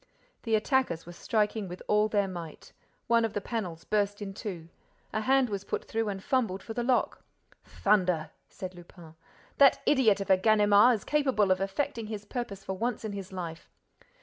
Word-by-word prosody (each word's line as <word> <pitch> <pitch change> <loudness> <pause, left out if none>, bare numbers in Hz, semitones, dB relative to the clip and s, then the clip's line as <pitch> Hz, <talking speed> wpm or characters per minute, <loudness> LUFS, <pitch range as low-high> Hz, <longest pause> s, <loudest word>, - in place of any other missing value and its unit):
The 225 -2 +1
attackers 220 - 0
were 175 - -9
striking 210 +3 -1
with 180 +1 -8
all 210 0 +3
their 205 -2 +1
might. 170 -4 -9 0.3
One 235 0 +3
of 225 -2 -1
the - - -1
panels 190 -7 -4
burst 205 -1 0
in 200 -2 -6
two. 180 -5 -6 0.5
A 215 - 0
hand 265 +2 +3
was 200 -3 -4
put - - -4
through 225 -1 -1
and 195 -1 -5
fumbled 220 -8 0
for 225 - -6
the 240 - -2
lock. 250 +1 0 0.4
"Thunder!" 180 -6 +1 0.2
said 185 -1 -7
Lupin. 175 -2 -14 0.5
"That 275 -2 +7
idiot 235 -8 +4
of 195 -1 -1
a 190 - +7
Ganimard 210 +3 +5
is 210 - -7
capable 265 -10 +2
of 185 0 +2
effecting 225 +4 -2
his 210 -1 -6
purpose 205 -4 -5
for 190 - -4
once 230 +3 -2
in 215 - -3
his 195 -2 -7
life." 170 -3 -7
205 Hz, 185 wpm, -29 LUFS, 185-225 Hz, 0.5 s, That